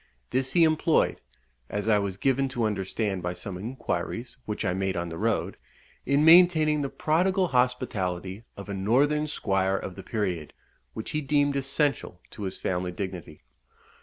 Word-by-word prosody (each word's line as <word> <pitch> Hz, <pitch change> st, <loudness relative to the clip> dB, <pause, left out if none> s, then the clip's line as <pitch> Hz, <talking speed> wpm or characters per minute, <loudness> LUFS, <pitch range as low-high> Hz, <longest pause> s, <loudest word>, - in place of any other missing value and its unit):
This 130 Hz, 0 st, 0 dB
he 170 Hz, -, +5 dB
employed 160 Hz, 0 st, +2 dB, 0.5 s
(as 105 Hz, +1 st, -3 dB
I 105 Hz, -2 st, +4 dB
was 100 Hz, -2 st, -3 dB
given 135 Hz, +3 st, +1 dB
to 125 Hz, -3 st, -2 dB
understand 100 Hz, -1 st, -1 dB
by 90 Hz, 0 st, -2 dB
some 90 Hz, +2 st, -7 dB
inquiries 115 Hz, +1 st, -4 dB
which 105 Hz, 0 st, -3 dB
I 90 Hz, -, +1 dB
made 95 Hz, 0 st, -1 dB
on 85 Hz, 0 st, -2 dB
the 80 Hz, -, -6 dB
road) -, -, 0 dB, 0.5 s
in 140 Hz, +3 st, +3 dB
maintaining 160 Hz, -3 st, +6 dB
the 140 Hz, -, -2 dB
prodigal 180 Hz, +6 st, +1 dB
hospitality 110 Hz, -, -1 dB
of 100 Hz, -, -8 dB
a 100 Hz, -, -4 dB
northern 140 Hz, +10 st, +2 dB
squire 95 Hz, -8 st, 0 dB
of 95 Hz, -, -6 dB
the -, -, -8 dB
period, 90 Hz, -8 st, -3 dB, 0.4 s
which 110 Hz, -, -5 dB
he 155 Hz, -, -1 dB
deemed 145 Hz, 0 st, +2 dB
essential 140 Hz, -, -1 dB
to -, -, -10 dB
his 95 Hz, -, -4 dB
family 90 Hz, -1 st, -2 dB
dignity. 90 Hz, -4 st, -7 dB
110 Hz, 165 wpm, -27 LUFS, 95-145 Hz, 0.5 s, maintaining